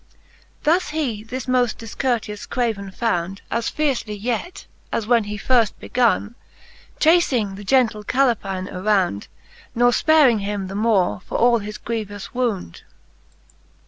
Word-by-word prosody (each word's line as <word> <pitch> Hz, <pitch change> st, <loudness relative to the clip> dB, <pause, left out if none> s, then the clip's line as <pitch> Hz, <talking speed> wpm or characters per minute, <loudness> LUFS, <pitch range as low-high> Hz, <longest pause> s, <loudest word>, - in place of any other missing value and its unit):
There 325 Hz, +4 st, +4 dB
he 300 Hz, -, -3 dB
this 250 Hz, +2 st, -5 dB
moft 250 Hz, -2 st, +1 dB
difcourteous 225 Hz, -2 st, -3 dB
craven 220 Hz, -5 st, -1 dB
found, 190 Hz, -3 st, -2 dB
* -, -, -31 dB
As 230 Hz, 0 st, 0 dB
fiercely 265 Hz, -8 st, -1 dB
yet, 240 Hz, -, -4 dB, 0.3 s
as 225 Hz, -, -1 dB
when 230 Hz, -1 st, +3 dB
he 210 Hz, 0 st, -5 dB
firft 230 Hz, 0 st, +2 dB
begonne, 235 Hz, -3 st, +1 dB, 0.7 s
Chafing 280 Hz, -, +3 dB
the 200 Hz, +1 st, -9 dB
gentle 225 Hz, -2 st, +2 dB
Caleplne 205 Hz, -7 st, 0 dB
around, 185 Hz, -, 0 dB, 0.5 s
Ne 240 Hz, +1 st, +3 dB
fparing 255 Hz, -1 st, +4 dB
him 200 Hz, -1 st, -3 dB
the -, -, -6 dB
more 200 Hz, -, +1 dB
for -, -, -2 dB
all 240 Hz, 0 st, +4 dB
his 210 Hz, 0 st, -7 dB
grievous 210 Hz, -3 st, -5 dB
wound. 230 Hz, -, -2 dB
225 Hz, 135 wpm, -22 LUFS, 205-250 Hz, 0.7 s, There